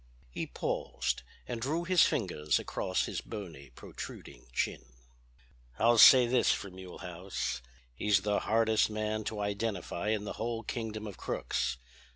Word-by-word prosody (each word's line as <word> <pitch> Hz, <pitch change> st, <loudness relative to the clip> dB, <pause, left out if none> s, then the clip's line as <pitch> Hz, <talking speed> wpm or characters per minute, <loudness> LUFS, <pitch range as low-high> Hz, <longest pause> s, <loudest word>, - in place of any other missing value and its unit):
He -, -, -4 dB
paused -, -, -2 dB, 0.3 s
and 115 Hz, -, -4 dB
drew 155 Hz, +7 st, 0 dB
his 180 Hz, 0 st, +4 dB
fingers 75 Hz, -, +2 dB
across 95 Hz, -, -1 dB
his -, -, -3 dB
bony 80 Hz, -11 st, -8 dB
protruding 65 Hz, -, -10 dB
chin. -, -, -1 dB, 0.9 s
"I'll 115 Hz, +1 st, +4 dB
say 130 Hz, +1 st, +10 dB
this 120 Hz, +1 st, +3 dB
for 100 Hz, -, -3 dB
Mulehaus: 90 Hz, -5 st, -5 dB, 0.3 s
He's 100 Hz, +8 st, +2 dB
the 105 Hz, 0 st, +1 dB
hardest 110 Hz, 0 st, +3 dB
man 110 Hz, 0 st, -2 dB
to 110 Hz, -, -3 dB
identify 100 Hz, -3 st, -2 dB
in 105 Hz, -1 st, +1 dB
the 105 Hz, -, -4 dB
whole 115 Hz, 0 st, -2 dB
kingdom 110 Hz, -2 st, -4 dB
of 100 Hz, -4 st, -7 dB
crooks. -, -, -2 dB
105 Hz, 140 wpm, -31 LUFS, 95-115 Hz, 0.9 s, say